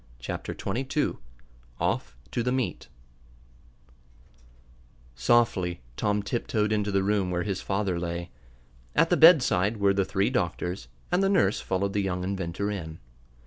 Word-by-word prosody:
Chapter - - -5
Twenty 115 +7 -3
Two 140 +3 -1 0.6
Off 65 -1 -1
to 120 - -1
the 125 +2 0
Meet 130 -1 -2 2.3
Softly 90 - +2
Tom 105 +3 0
tiptoed 105 -1 -1
into 105 -1 0
the 95 -1 +2
room 100 -2 +1
where 90 0 -1
his 95 -2 -3
father 95 -3 -1
lay. 85 0 -4 0.6
At - - +3
the - - +6
bedside 125 - +6
were 100 -1 +3
the 100 0 +2
three 95 +1 0
doctors, 90 0 -2 0.2
and 180 +2 +3
the 195 - +3
nurse 165 - +3
followed 100 +1 -1
the 105 - +1
young 90 -2 -2
inventor 95 +1 -2
in. 80 -5 -6
100 Hz, 145 wpm, -27 LUFS, 90-105 Hz, 2.3 s, the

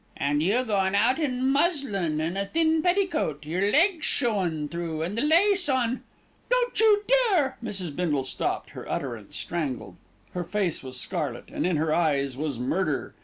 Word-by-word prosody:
"And 145 +1 +1
you 210 +10 +2
goin' 195 -3 +1
out 235 +8 +3
in 260 -4 0
muslin 270 - +1
and 165 +3 -2
a 200 0 -2
thin 320 +2 +2
petticoat, 350 - 0
and 150 - -8
yer 190 +4 +1
legs 340 - +3
showin' 185 - 0
through 165 -1 -4
and 180 +5 -3
the 230 - 0
lace 350 +3 +3
on 255 -2 +1 0.2
" - - -36
"Don't - - +1
you 425 -2 +5 0.3
dare 290 -9 +1
" - - -16
Mrs. 190 -9 -4
Bindle 150 -7 0
stopped, 130 - -3
her - - -9
utterance 120 -7 -4
strangled. 130 - -4 0.4
Her 180 - -2
face 185 -1 -1
was 130 -1 -7
scarlet, - - -4
and - - -1
in 180 - +1
her 155 0 +1
eyes 140 -6 +1
was 145 -2 -3
murder. 150 +5 -1
190 Hz, 180 wpm, -26 LUFS, -, 0.4 s, you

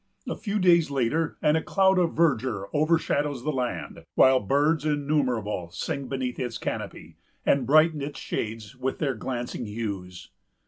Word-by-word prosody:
A - - -2
few 210 -1 -3
days 170 -5 +4
later, 140 +4 0
and 150 - +4
a 160 - +2
cloud 190 0 +3
of 170 -2 +1
verdure 125 -11 +1
overshadows 150 -3 +1
the 155 - 0
land; 125 -3 -4
while 130 0 +6
birds 145 +8 +1
innumerable 135 - 0
sing 135 +9 -4
beneath 130 -2 -3
its 120 -3 -3
canopy, - - -6 0.3
and 135 -3 +2
brighten 155 +1 +4
its 140 0 -5
shades 110 -2 -4
with 130 +1 -3
their 140 -4 0
glancing 120 0 -4
hues. 100 -5 -6
135 Hz, 150 wpm, -26 LUFS, 115-155 Hz, 0.3 s, while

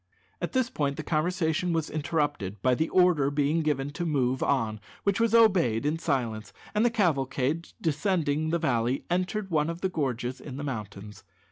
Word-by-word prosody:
At - - -3
this 260 -2 +1
point 140 -2 -1
the - - -4
conversation 170 +1 0
was 160 -2 0
interrupted 145 - -1
by 130 - +4
the 160 +6 0
order 180 -7 +4
being 145 +3 +1
given 145 -2 -1
to 175 - -4
move 130 -5 0
on, 110 -6 0 0.2
which 200 +1 +1
was 230 0 +3
obeyed 175 - +4
in 155 +2 0
silence, 120 -9 -2 0.2
and 210 +1 +2
the 240 - +4
cavalcade, 155 - 0
descending 155 -1 0
the 170 - +2
valley, 125 -5 0
entered 185 +2 -1
one 155 -1 +2
of 170 +1 -5
the 190 - +1
gorges 130 -6 -2
in 135 -3 -8
the 145 - -5
mountains. 105 -5 -6
150 Hz, 175 wpm, -28 LUFS, 130-175 Hz, 0.2 s, by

